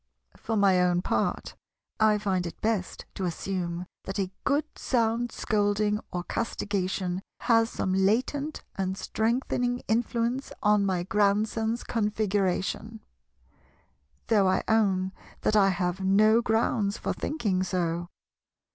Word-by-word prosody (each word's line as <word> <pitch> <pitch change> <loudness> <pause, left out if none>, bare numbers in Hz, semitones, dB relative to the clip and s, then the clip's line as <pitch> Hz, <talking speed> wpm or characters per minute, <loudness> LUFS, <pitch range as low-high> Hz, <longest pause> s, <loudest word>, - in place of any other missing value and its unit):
For 225 - -3
my 195 -3 +4
own 180 0 +2
part, - - -1 0.4
I 215 -1 +4
find 190 -4 -1
it 170 - -9
best 215 -4 -2
to 190 - -3
assume 175 0 -3 0.2
that 195 - -4
a 190 -2 -1
good 285 +2 +2
sound 235 -1 0
scolding 210 -1 +1
or 175 -1 -3
castigation 190 -4 -2 0.2
has 225 -1 +3
some 185 - -2
latent 250 +10 0
and 190 0 -2
strengthening 245 +3 -1
influence 235 +3 0
on 210 -1 +4
my 180 -2 0
Grandson's 215 +4 +1
Configuration; 210 0 -1 1.2
though 205 -4 +3
I 185 - +1
own 195 -4 +2 0.3
that 215 - +1
I 195 -2 +5
have 180 0 -1
no 215 +4 +4
grounds 220 -2 +1
for - - -2
thinking 210 -12 -1
so. 175 -2 -1
205 Hz, 120 wpm, -27 LUFS, 185-225 Hz, 1.2 s, I